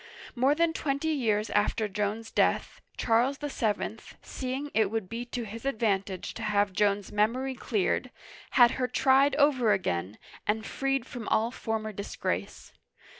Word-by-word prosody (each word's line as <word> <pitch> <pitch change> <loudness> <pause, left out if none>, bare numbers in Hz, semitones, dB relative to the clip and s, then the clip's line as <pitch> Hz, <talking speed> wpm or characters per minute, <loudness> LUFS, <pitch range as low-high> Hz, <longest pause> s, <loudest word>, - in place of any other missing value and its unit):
More 265 +4 +3
than 335 0 +2
twenty 280 0 -1
years 225 -8 0
after 210 +1 +1
Joan's 210 +2 -3
death, - - +1 0.2
Charles 245 +4 +2
VII., 225 -6 -2 0.2
seeing 265 +3 -4
it 215 -3 +3
would 220 -3 -2
be 230 +4 -5
to 240 -1 -4
his 225 +2 -8
advantage 205 -7 -1
to - - -8
have 205 -2 +1
Joan's 200 0 +1
memory 240 +6 +1
cleared, 230 0 -1 0.5
had 240 -2 +8
her 250 - +2
tried 270 +2 +4
over 270 -7 +4
again, 95 - -2 0.3
and 220 +1 0
freed 270 -1 -1
from 245 -4 -7
all 225 +2 +2
former 220 -3 -3
disgrace. 200 +1 -4
225 Hz, 145 wpm, -28 LUFS, 210-265 Hz, 0.5 s, had